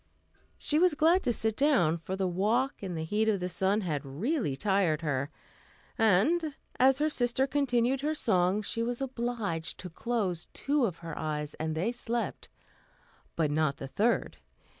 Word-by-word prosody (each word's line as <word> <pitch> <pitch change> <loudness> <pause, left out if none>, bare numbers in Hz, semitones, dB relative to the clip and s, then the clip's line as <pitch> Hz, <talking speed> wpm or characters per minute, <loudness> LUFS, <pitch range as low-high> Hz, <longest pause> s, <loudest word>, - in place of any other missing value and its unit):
She 300 - +1
was 355 -3 +4
glad 330 +5 +4
to 245 - +3
sit 220 -2 0
down, 220 - +3
for 185 +4 -4
the 190 -1 0
walk 220 +9 0
and 185 -4 -4
the 160 - -2
heat 210 +7 +1
of 205 -3 +1
the 180 - -2
sun 195 +3 0
had 155 -6 -2
really 165 - -1
tired 185 -1 +1
her; 140 -3 -1 0.7
and, 275 - +2 0.2
as 260 +1 +5
her 300 +2 +2
sister 255 -3 +1
continued 265 -2 +1
her 305 +2 0
song, 190 -4 +2
she 230 - -2
was 240 +1 -2
obliged 235 -10 -3
to 180 - -7
close 190 -4 -2
two 285 -2 +1
of 175 -4 -6
her 165 - -5
eyes, 150 -1 -3
and 160 0 -2
they 185 +9 0
slept, 240 -1 -3 0.9
but 155 -3 +1
not 150 -2 +1
the 135 - -6
third. 220 - 0
210 Hz, 170 wpm, -30 LUFS, 165-255 Hz, 0.9 s, as